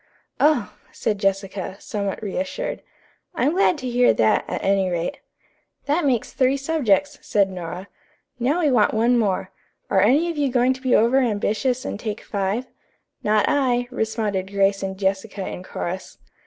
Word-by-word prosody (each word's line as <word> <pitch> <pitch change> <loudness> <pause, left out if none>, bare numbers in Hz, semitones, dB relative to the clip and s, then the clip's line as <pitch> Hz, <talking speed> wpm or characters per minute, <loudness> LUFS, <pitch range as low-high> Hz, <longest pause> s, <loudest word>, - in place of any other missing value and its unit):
"Oh," 300 +1 +2 0.2
said 210 -2 -2
Jessica, 195 -1 -2
somewhat 200 0 -4
reassured, 280 - -3 0.5
"I'm 275 +2 +2
glad 365 -1 +3
to 260 -3 -5
hear 245 0 +3
that, 110 -1 +3
at - - -4
any 195 -1 +2
rate." 175 -1 -2 0.7
"That 295 +3 +1
makes 245 -5 0
three 265 +1 +2
subjects," 285 -2 +1
said 200 -2 +1
Nora. 180 +1 -6 0.5
"Now 280 +9 +1
we 300 -4 +3
want 220 -3 +3
one 235 +3 +3
more. 195 -4 0 0.4
Are 190 - +4
any 275 - +4
of 325 - -8
you 285 -2 +2
going 250 +1 +3
to 260 - -12
be 255 -1 +3
over 235 +5 +4
ambitious 245 +2 0
and - - -4
take 215 -1 -4
five?" 200 +4 -2 0.6
"Not 210 0 +2
I," 245 -3 +1
responded 215 -5 -2
Grace 195 0 +2
and 190 0 -4
Jessica 195 0 -2
in - - -6
chorus. 185 0 -6
220 Hz, 160 wpm, -23 LUFS, 195-260 Hz, 0.7 s, Are